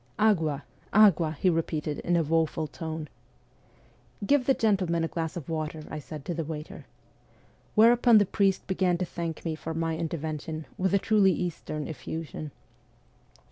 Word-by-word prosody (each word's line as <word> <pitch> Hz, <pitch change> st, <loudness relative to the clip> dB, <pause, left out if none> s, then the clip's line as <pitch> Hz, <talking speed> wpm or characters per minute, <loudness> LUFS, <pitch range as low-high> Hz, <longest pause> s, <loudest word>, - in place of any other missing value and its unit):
' -, -, -36 dB
Agua, 155 Hz, -7 st, -1 dB, 0.3 s
agua,' 175 Hz, -7 st, +5 dB
he -, -, +1 dB
repeated 155 Hz, -3 st, 0 dB
in 175 Hz, -, 0 dB
a 170 Hz, -, +3 dB
woful 160 Hz, 0 st, +1 dB
tone. 160 Hz, +1 st, -6 dB, 0.6 s
' -, -, -14 dB
Give 275 Hz, +1 st, +3 dB
the 270 Hz, -, +5 dB
gentle 200 Hz, -6 st, +1 dB
man 170 Hz, -1 st, +1 dB
a -, -, +1 dB
glass 165 Hz, +1 st, -4 dB
of 155 Hz, -, -7 dB
water,' 155 Hz, -1 st, -3 dB
I 155 Hz, -, -4 dB
said 150 Hz, 0 st, -9 dB
to 175 Hz, -, -2 dB
the 165 Hz, 0 st, -2 dB
waiter. 155 Hz, 0 st, -7 dB, 0.9 s
Where 225 Hz, +2 st, +7 dB
upon 240 Hz, -1 st, +5 dB
the 205 Hz, -, +5 dB
priest 195 Hz, 0 st, +1 dB
began 185 Hz, -2 st, +1 dB
to 180 Hz, -, -1 dB
thank 170 Hz, -1 st, -5 dB
me 165 Hz, -, -1 dB
for 160 Hz, +1 st, -5 dB
my 165 Hz, 0 st, -1 dB
intervention 160 Hz, -1 st, -4 dB
with 190 Hz, +1 st, +1 dB
a -, -, +6 dB
truly 200 Hz, -2 st, +4 dB
Eastern 155 Hz, -4 st, -4 dB
effusion. 160 Hz, 0 st, -6 dB
165 Hz, 175 wpm, -28 LUFS, 155-190 Hz, 0.9 s, Where